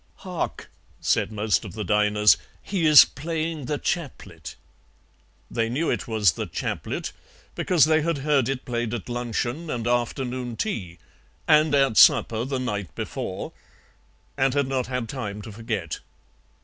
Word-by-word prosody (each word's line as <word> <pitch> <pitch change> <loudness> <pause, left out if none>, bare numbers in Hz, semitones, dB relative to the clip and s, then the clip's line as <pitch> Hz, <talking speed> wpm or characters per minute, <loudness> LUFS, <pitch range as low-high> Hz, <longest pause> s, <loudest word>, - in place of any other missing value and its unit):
"'Hark!' 180 -3 -5 0.3
said - - +1
most 105 -4 0
of - - -8
the 110 0 -4
diners, 105 +1 +4 0.3
'he 180 -5 0
is 150 -2 +10
playing 160 0 -4
"The 145 +3 -1
Chaplet."' 95 - -5 1.0
"They 115 -1 0
knew 150 +7 0
it - - -2
was 110 -5 +3
'The - - -5
Chaplet' - - -4 0.4
because 170 -6 +3
they 155 0 +3
had 165 0 0
heard 140 -5 +2
it 135 -2 -3
played 120 -1 -2
at 115 - -7
luncheon 120 +6 -3
and 120 -5 -3
afternoon 120 0 -1
tea, 90 - -3 0.5
and 155 -1 +5
at 135 -5 +3
supper 115 +1 +5
the 135 0 -2
night 105 - -4
before, - - -5 0.8
and 135 -1 +1
had 140 -1 +2
not 130 -2 -1
had 125 -2 -3
time 105 -5 -5
to 110 - -8
forget. 105 -6 -4
125 Hz, 150 wpm, -24 LUFS, 110-145 Hz, 1.0 s, is